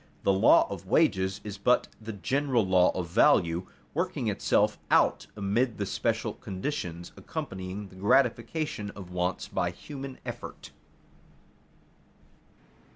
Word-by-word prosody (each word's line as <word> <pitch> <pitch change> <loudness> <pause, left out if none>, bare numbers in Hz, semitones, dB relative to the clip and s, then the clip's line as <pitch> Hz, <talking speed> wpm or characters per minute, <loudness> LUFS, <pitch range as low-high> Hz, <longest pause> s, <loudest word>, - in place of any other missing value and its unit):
The 100 - +4
law 95 - +6
of - - -7
wages 95 0 +2
is 105 -2 -7
but 125 +4 +3
the 110 +1 -6
general 130 +2 +1
law 90 -1 +5
of 90 -2 -2
value, 85 +1 +3 0.3
working - - -1
itself - - +1
out - - +3
amid 110 +4 0
the 100 - -1
special - - -1
conditions 95 - -5
accompanying 95 +2 -6
the 95 - -16
gratification 120 +2 +1
of 95 -3 -9
wants 90 +1 -1
by 90 - -1
human 135 +8 -8
effort. - - -7
100 Hz, 120 wpm, -28 LUFS, 95-120 Hz, 0.3 s, law